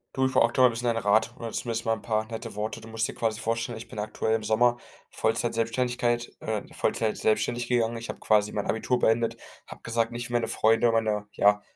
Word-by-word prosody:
Du 130 0 +2
ich 130 - +1
brauche 130 - +5
aktuell 125 +2 +5
'n 120 - 0
bisschen 115 +2 -5
deinen 115 -1 +1
Rat 110 +3 +2
oder 115 -2 -5
zumindest 115 -1 -3
mal 115 - +2
'n - - -5
paar 110 -1 0
nette 110 -2 -6
Worte. 110 +2 -4
Du 110 - -11
musst 115 +1 -1
dir - - -7
quasi 110 -1 -1
vorstellen, 115 0 -2
ich 115 - -9
bin - - -7
aktuell 110 +1 -1
im 110 - -3
Sommer 120 +3 +3 0.3
Vollzeit 115 +1 0
Selbstständigkeit 120 +1 0
äh, 110 -2 -2
Vollzeit 110 -2 0
selbstständig 120 +2 0
gegangen. 115 -1 +1
Ich 115 - -8
habe - - -6
quasi 105 -1 +2
mein 105 - -2
Abitur 125 +3 0
beendet, 115 0 +2 0.3
habe - - -11
gesagt, 115 0 0
nicht 120 0 -5
wie - - -7
meine 120 -1 +1
Freunde, 115 +2 +3
meiner, 110 -2 0
ja, 105 0 +4
115 Hz, 230 wpm, -27 LUFS, 110-120 Hz, 0.3 s, brauche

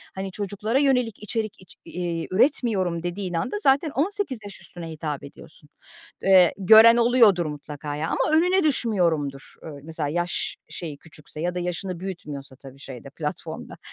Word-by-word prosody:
hani, 190 0 -4
çocuklara 205 +5 -1
yönelik 250 -6 +1
içerik 215 -1 -3
iç 185 - -17
iii 170 -2 -3
üretmiyorum 190 - +1
dediğin 180 +1 -3
anda 245 - -2
zaten 280 -2 +3
18 320 - -1
yaş 200 - -9
üstüne 170 -2 -8
hitap 150 -3 -5
ediyorsun. 150 +1 -9 0.5
Eee, 185 -3 +6
gören 220 +4 +8
oluyordur 230 -7 +5
mutlaka 150 0 -6
ya 155 +2 -2
ama 310 - +2
önüne 365 +2 +3
düşmüyorumdur. 170 - 0
Iıı, 150 -3 -8
mesela 155 -2 -4
yaş 175 +2 -2
şeyi 155 -4 -6
küçükse 155 0 -12
ya 175 +1 -1
da - - -1
yaşını 180 0 -4
büyütmüyorsa 145 -8 -7
tabii 135 0 -14
şeyde, 135 -1 -10
platformda. 150 +1 -6
180 Hz, 150 wpm, -24 LUFS, 155-225 Hz, 0.5 s, gören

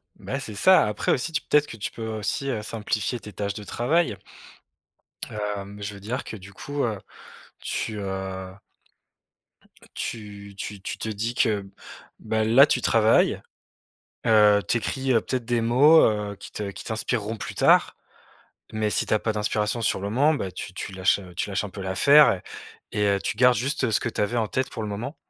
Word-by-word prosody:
Bah, 135 - -5
c'est 110 -7 -7
ça. 185 - +5
Après 105 - -1
aussi, 140 +6 0
tu 155 - -1
peut-être 150 0 +2
que 115 - -9
tu 105 - -4
peux, - - -10
heu, 110 -1 -3
aussi, 135 +6 -2
heu, 110 -4 -2
simplifier 110 +2 -2
tes 105 - -11
tâches 100 -1 -3
de 105 - -8
travail. 150 - 0 1.1
Hem, 105 -1 -5
je 100 0 -4
veux - - -11
dire 115 +6 -4
que, 110 - -8
du 100 +1 -13
coup, 145 +8 -4
heu, 110 -4 -1 0.6
tu, 110 -2 -3
heu 95 -1 -5 1.3
heu, - - -16
tu 100 -3 -6
tu 100 -1 -6
tu - - -5
te 110 - -4
dis 110 +3 -3
que, 105 -5 +1 0.5
bah, 110 0 -1
là, 120 +6 +7
tu 130 -4 0
travailles, 110 0 +3 0.9
heu, 105 -2 +6
tu 115 - +2
écris, 130 +3 -1
heu, 115 - +4
peut-être 125 0 -3
des 120 0 0
mots, 140 +8 +6
heu, 105 -2 0
qui - - -12
te 105 -2 -4
qui - - -10
t'inspireront 110 0 -2
plus 105 - -6
tard. - - +4 0.8
Mais 110 -1 0
si - - 0
tu - - 0
as 110 - +3
pas 110 - -1
d'inspiration 105 +2 -1
sur 105 - +1
le 100 - -3
moment, 145 +8 +3
bah, 95 -10 -3
tu 90 - -7
tu 95 - -6
lâches, 95 +2 +2
heu, 90 -2 -12
tu 100 - -2
lâches 100 - -1
un 105 - -5
peu 95 - -8
l'affaire 140 +11 +6
et 90 - -7 0.6
et 105 - +3
heu, 100 0 +2
tu - - -2
gardes 125 0 +5
juste 130 0 0
ce - - +3
que - - -2
tu - - -3
avais 115 +4 0
en 110 -2 +1
tête 130 +4 -1
pour 110 - -6
le 105 - -4
moment. 115 +9 -5
110 Hz, 205 wpm, -25 LUFS, 100-120 Hz, 1.3 s, là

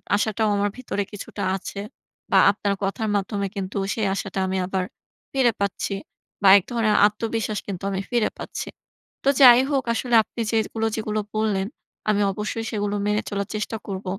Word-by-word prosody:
আশাটাও 215 +1 +1
আমার 205 0 +1
ভিতরে 230 -5 -2
কিছুটা 205 - -6
আছে 195 +1 -6 0.5
বা - - +5
আপনার 200 0 -1
কথার 215 +3 -1
মাধ্যমে 200 0 -1
কিন্তু 195 0 -4 0.2
সেই 220 -3 -1
আশাটা 195 -1 -3
আমি 190 0 -1
আবার 190 0 -1 0.5
ফিরে 260 -3 +4
পাচ্ছি 200 0 -1 0.5
বা 200 - +4
এক 195 - 0
ধরনের 225 -3 +2
আত্মবিশ্বাস 220 0 -2
কিন্তু 195 -1 -5
আমি 190 0 -1
ফিরে 240 -2 +2
পাচ্ছি। - - -6 0.6
তো 275 - +3
যাই 245 -2 +10
হোক 270 -3 +1
আসলে 240 0 0
আপনি 235 - -7
যেগুলো, 225 0 0
যেগুলো 215 -1 -2 0.2
বললেন 205 -3 +1 0.4
আমি 205 -1 +3
অবশ্যই 210 +3 -4
সেগুলো 205 -1 -1
মেনে 210 +1 +1
চলার 200 -1 -2
চেষ্টা 215 +1 -2
করব। 195 0 -5
210 Hz, 165 wpm, -24 LUFS, 200-225 Hz, 0.6 s, যাই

